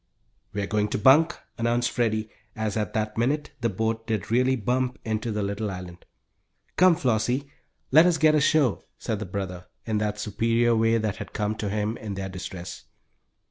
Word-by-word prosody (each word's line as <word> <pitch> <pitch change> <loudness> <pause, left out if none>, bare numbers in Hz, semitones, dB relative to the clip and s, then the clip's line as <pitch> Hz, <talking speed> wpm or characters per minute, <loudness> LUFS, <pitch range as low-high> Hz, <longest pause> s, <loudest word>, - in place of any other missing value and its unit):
"We're 100 0 -2
going 105 +1 0
to - - -2
bunk," 135 +9 +5 0.2
announced 120 +1 +1
Freddie, 110 -2 0 0.2
as 110 -2 -2
at 110 +2 -2
that 110 0 -1
minute 145 +5 0
the 115 - +1
boat 115 +3 -2
did 110 -2 -2
really 130 +2 +3
bump 125 +2 -1
into 110 +1 -2
the 105 -1 -1
little 100 +2 -2
island. 90 -2 -8 0.7
"Come, 180 -1 +6
Flossie, 125 0 0 0.4
let 160 +5 +7
us 175 -2 +2
get 155 -1 +5
ashore," 150 -5 +3 0.2
said 110 - -3
the 110 - -5
brother, 90 -1 -5 0.2
in 110 -2 0
that 105 0 -1
superior 115 +3 +1
way 115 +1 +3
that 110 -3 -2
had - - -8
come 105 0 -1
to 105 - -2
him 105 +2 -1
in 105 -3 -6
their 95 0 -4
distress. 90 -1 -7
110 Hz, 180 wpm, -26 LUFS, 105-125 Hz, 0.7 s, let